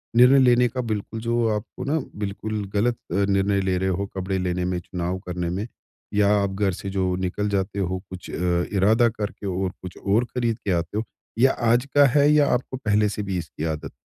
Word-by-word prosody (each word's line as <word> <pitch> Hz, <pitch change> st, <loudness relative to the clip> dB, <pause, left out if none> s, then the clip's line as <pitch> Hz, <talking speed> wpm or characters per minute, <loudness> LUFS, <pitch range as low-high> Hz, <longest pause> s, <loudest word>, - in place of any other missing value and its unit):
निर्णय 125 Hz, +3 st, +7 dB
लेने 125 Hz, -1 st, +5 dB
का 125 Hz, +2 st, -3 dB
बिल्कुल 110 Hz, -1 st, -4 dB
जो 115 Hz, 0 st, +1 dB
आपको 105 Hz, +3 st, -6 dB
ना 155 Hz, +3 st, +1 dB, 0.2 s
बिल्कुल 105 Hz, +1 st, -3 dB
गलत 115 Hz, +4 st, +2 dB, 0.2 s
अ, -, -, -1 dB
निर्णय 100 Hz, 0 st, +2 dB
ले 95 Hz, -1 st, 0 dB
रहे 95 Hz, +1 st, 0 dB
हो 95 Hz, +2 st, -1 dB
कपड़े 95 Hz, 0 st, -2 dB
लेने 90 Hz, -1 st, -1 dB
में 90 Hz, -1 st, -1 dB
चुनाव 90 Hz, +1 st, -3 dB
करने 90 Hz, -1 st, -2 dB
में? 100 Hz, +6 st, -3 dB, 0.5 s
या 100 Hz, -1 st, +3 dB
आप 100 Hz, -1 st, 0 dB
घर 100 Hz, -2 st, +2 dB
से 100 Hz, -, -6 dB
जो 95 Hz, -2 st, 0 dB
निकल 95 Hz, +3 st, -2 dB
जाते 100 Hz, 0 st, -1 dB
हो 95 Hz, 0 st, -1 dB
कुछ 95 Hz, -2 st, -9 dB
अ, 90 Hz, 0 st, 0 dB
इरादा 110 Hz, +5 st, +4 dB
करके 105 Hz, -2 st, -5 dB
और 95 Hz, 0 st, -1 dB
कुछ 90 Hz, -1 st, -9 dB
और 105 Hz, +5 st, +1 dB
खरीद 120 Hz, -2 st, -2 dB
के 100 Hz, -, -2 dB
आते 85 Hz, +4 st, -1 dB
हो? 110 Hz, -, 0 dB, 0.4 s
या 135 Hz, +2 st, +6 dB, 0.2 s
आज 120 Hz, +3 st, +3 dB
का 145 Hz, 0 st, +8 dB
है 145 Hz, 0 st, +5 dB
या 150 Hz, -2 st, +5 dB
आपको 125 Hz, +1 st, -2 dB
पहले 105 Hz, -3 st, +2 dB
से 105 Hz, 0 st, -4 dB
भी 95 Hz, -2 st, -2 dB
इसकी 80 Hz, -2 st, -6 dB
आदत 75 Hz, -, -7 dB
100 Hz, 215 wpm, -24 LUFS, 95-115 Hz, 0.5 s, का